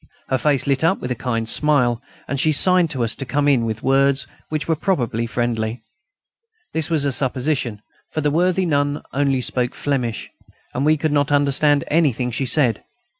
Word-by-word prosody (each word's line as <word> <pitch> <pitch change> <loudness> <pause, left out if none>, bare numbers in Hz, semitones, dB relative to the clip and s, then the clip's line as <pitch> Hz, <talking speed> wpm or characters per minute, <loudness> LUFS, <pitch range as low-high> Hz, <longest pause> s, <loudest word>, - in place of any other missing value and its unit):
Her 130 - +1
face 145 -2 +1
lit 140 0 +1
up 165 - +2
with 125 - -5
a - - 0
kind 115 -1 -1
smile, 125 -3 +2 0.3
and 140 - -3
she 155 - +3
signed 180 +3 +4
to 135 -6 -2
us 115 - 0
to - - -6
come 145 +3 0
in, 130 -5 +3
with 110 -1 -4
words 135 +1 +2 0.2
which 155 -1 -3
were 165 - +2
probably 120 - -1
friendly. 115 -1 -2 0.9
This 160 0 -1
was 155 -4 +2
a 140 - +1
supposition, 130 -4 -1 0.3
for 155 - -2
the 150 0 +1
worthy 180 +4 +1
nun 145 -2 0
only 135 -2 +1
spoke 125 0 0
Flemish, 125 -6 -2 0.4
and 135 +3 -1
we 155 0 +4
could 155 0 -1
not 145 0 +1
understand 145 0 +3
anything 135 -6 +1
she 130 +3 -2
said. 125 -5 +1
140 Hz, 185 wpm, -20 LUFS, 125-150 Hz, 0.9 s, signed